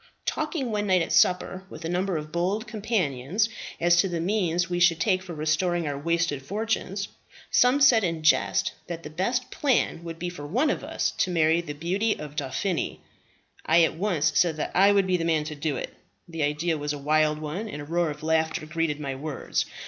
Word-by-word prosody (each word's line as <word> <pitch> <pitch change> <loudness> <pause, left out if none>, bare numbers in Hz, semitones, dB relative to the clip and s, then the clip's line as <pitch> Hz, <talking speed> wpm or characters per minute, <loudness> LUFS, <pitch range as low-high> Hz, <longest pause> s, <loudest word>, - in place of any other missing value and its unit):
"Talking 305 -5 -2
one 210 -1 -1
night 185 -3 +3
at - - -3
supper 185 +1 +2
with 160 - -9
a - - -1
number 180 +1 0
of 155 0 -6
bold 185 +7 -1
companions, 205 - -1 0.3
as 175 0 +4
to 190 +2 +3
the 170 -1 -2
means 175 -2 0
we 175 -1 -2
should 175 -2 +4
take 185 +1 +2
for 180 -3 -8
restoring 160 +2 0
our 145 - -2
wasted 165 -1 0
fortunes, 200 +3 -2 0.4
some 250 +3 +4
said 245 -6 +6
in 165 -3 -2
jest 155 - +3 0.2
that 170 -1 -6
the 150 - -8
best 240 +10 -1
plan 255 - +1
would 165 -1 -6
be 175 - -4
for 160 -5 -7
one 255 - +2
of - - -3
us - - -1
to 185 - +2
marry 165 -1 +3
the 155 -3 -6
beauty 190 +8 0
of 150 -1 -8
Dauphiny. 160 +6 -2 0.6
I 165 +1 +5
at 160 - +2
once 165 -4 +1
said 165 -1 +2
that - - -3
I 195 +2 +6
would 200 -1 +3
be 185 -1 +2
the 165 - -2
man 160 -2 +1
to 155 0 -5
do 145 0 -2
it; - - -5 0.3
the 165 -2 -5
ideas 150 +2 0
was 145 0 -2
a - - -4
wild 150 +1 +2
one, 155 +9 -5
and 150 - -6
a 145 - -6
roar 170 +1 0
of 150 0 -7
laughter 160 -1 0
greeted 155 -1 -1
my 140 -2 -3
words. 140 +1 -3
170 Hz, 210 wpm, -26 LUFS, 155-195 Hz, 0.6 s, said